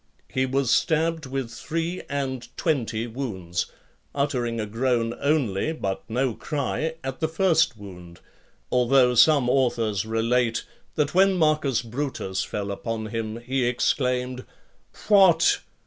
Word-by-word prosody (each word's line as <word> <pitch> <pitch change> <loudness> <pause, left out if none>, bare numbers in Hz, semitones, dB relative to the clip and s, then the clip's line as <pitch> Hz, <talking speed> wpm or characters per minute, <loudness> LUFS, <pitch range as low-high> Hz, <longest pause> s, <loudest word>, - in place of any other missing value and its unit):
He 130 0 0
was 130 -1 0
stabbed 160 -2 +1
with 130 -3 -4
three 165 +8 -3
and 130 -3 -3
twenty 115 -8 -1
wounds, 100 -9 -4 0.5
uttering 125 -5 -1
a 110 - -1
groan 115 +1 0
only, 140 -3 +1
but 95 -11 -3
no 125 +2 0
cry, 150 +5 -2
at 135 0 -5
the 160 - +1
first 160 - +2
wound; 90 -4 -11 0.5
although 125 0 +4
some 140 +1 +5
authors 120 -6 +1
relate, 115 +1 0 0.3
that 150 -2 0
when 195 +2 +5
Marcus 155 -7 +2
Brutus 115 -6 -3
fell 100 -1 -4
upon 110 +2 -4
him, 115 0 -4
he 125 0 0
exclaimed, 125 0 0 0.6
"What! 190 -6 +5
125 Hz, 125 wpm, -25 LUFS, 115-145 Hz, 0.6 s, some